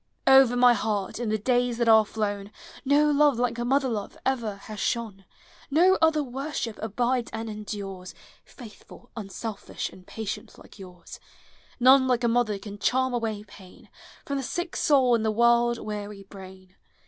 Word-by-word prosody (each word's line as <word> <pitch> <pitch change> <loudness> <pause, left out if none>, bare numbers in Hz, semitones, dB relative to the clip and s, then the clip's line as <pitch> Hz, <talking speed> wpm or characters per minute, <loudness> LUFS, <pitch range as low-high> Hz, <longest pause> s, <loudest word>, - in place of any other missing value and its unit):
Over 265 -2 +6
my 245 0 +6
heart, 210 -3 -2
in 240 -3 -2
the 215 - +1
days 245 +2 0
that 235 -1 0
are 220 -1 +7
down, 205 -2 -3 0.3
No 290 +2 +3
love 290 -3 +3
like 240 -1 -1
mother 265 +3 +1
love 215 -5 -4
ever 235 -6 -1
has 210 +1 -10
shone; 210 -5 -3 0.4
No 360 +6 +4
other 320 -2 +3
worship 265 -3 -5
abides 240 +3 -1
and 225 +1 -5
endures, 200 -3 -7 0.3
Faithful, 245 +1 -15
unselfish, 215 0 -6
and 185 -1 -16
patient, 220 -2 -6
like - - -16
yours: 180 -2 -12 0.6
None 260 +1 +6
like 250 -1 +1
a - - +3
mother 230 -3 +1
can 205 +1 -10
charm 260 +2 +1
away 220 -3 -3
pain 195 -3 -16 0.4
From 280 - -3
the 270 - -3
sick 350 +6 -4
soul 265 -4 +3
and 230 -2 +2
the 220 - +1
world 235 +1 +3
weary 210 -2 -7
brain. 190 -1 -13
230 Hz, 160 wpm, -26 LUFS, 210-255 Hz, 0.6 s, are